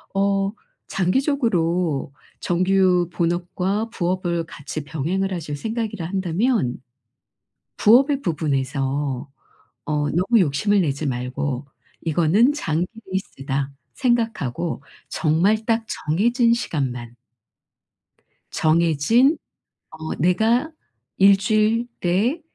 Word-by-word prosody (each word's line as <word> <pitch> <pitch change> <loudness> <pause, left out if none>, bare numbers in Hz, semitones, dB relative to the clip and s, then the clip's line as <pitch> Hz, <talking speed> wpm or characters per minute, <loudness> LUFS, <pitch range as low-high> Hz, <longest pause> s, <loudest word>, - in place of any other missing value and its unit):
어 195 0 +1 0.4
장기적으로 180 - 0 0.3
정규 180 -1 +2
본업과 180 +5 -1
부업을 175 -3 -1
같이 155 -1 -7
병행을 175 +7 -2
하실 150 -4 -4
생각이라 220 -2 -3
한다면 190 - 0 1.0
부업의 270 +6 +5
부분에서 140 - -1 0.6
어 150 -1 -1
너무 195 +7 +3
욕심을 190 +6 +2
내지 145 -2 -1
말고 130 +2 -3 0.4
'이거는 175 - +3
장기 170 - -1 0.2
레이스다.' 140 -7 -3 0.2
생각하고 225 - -1 0.3
정말 190 +8 +1
딱 225 -1 +1
정해진 235 - +2
시간만 125 - -3 1.4
정해진 170 - +3 0.5
어 160 0 -6
내가 220 - +2 0.5
1 195 +1 +6
주일 215 +4 +1
내에 205 - +1
180 Hz, 205 characters per minute, -22 LUFS, 150-215 Hz, 1.4 s, 1